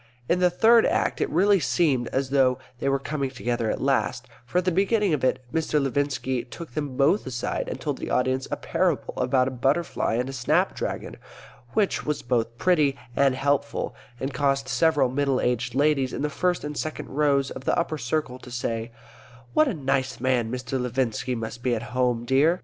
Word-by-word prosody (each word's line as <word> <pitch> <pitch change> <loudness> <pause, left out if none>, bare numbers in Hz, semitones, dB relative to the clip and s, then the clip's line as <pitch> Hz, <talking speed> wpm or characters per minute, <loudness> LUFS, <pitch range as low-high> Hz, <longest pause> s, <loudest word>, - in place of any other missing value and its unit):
In 180 - +2
the 180 0 +4
Third 225 +6 +5
Act - - 0
it - - +1
really 195 +5 +4
seemed 135 -4 +1
as 135 0 -2
though 130 -2 +3 0.2
they 140 - 0
were 135 - +2
coming 140 0 -3
together 120 -3 -2
at - - -1
last; - - 0 0.2
for 130 - -2
at 180 - +2
the 185 - +2
beginning 200 +1 +2
of 145 - -1
it 130 0 +1
Mr. 160 -2 +1
Levinski 135 -2 -1
took 165 0 -9
them 145 -3 -4
both 150 +6 +3
aside 125 -2 -3
and - - -5
told - - -3
the - - -5
audience 130 +1 +1
a - - -1
parable - - 0
about 125 0 +2
a - - -2
butterfly 135 -1 0
and 125 +2 0
a 135 - -5
snap 125 - +1
dragon, - - -4 0.6
which 205 -3 +1
was 150 0 -2
both 120 -1 -1
pretty 150 -6 +2 0.2
and 135 -1 +3
helpful, 140 +1 0 0.3
and 135 +1 -3
caused 135 0 +1
several 145 +2 +3
middle 135 +1 0
aged 125 0 -1
ladies 140 -2 +2
in - - -3
the 150 - -1
first 180 +4 0
and 150 0 -4
second 155 - -4
rows 140 -1 +1
of 130 - -8
the - - +1
upper 160 -2 -1
circle 125 +1 -2
to 125 - -12
say, 115 -1 -3 0.6
"What 310 - +4
a 260 - 0
nice 135 -2 -1
man 125 -3 +1
Mr. 125 +1 -3
Levinski 125 0 -1
must 115 0 -5
be 120 -1 +1
at 110 - -4
home, 125 -2 +1
dear!" 150 +8 +3
135 Hz, 200 wpm, -25 LUFS, 125-150 Hz, 0.6 s, Third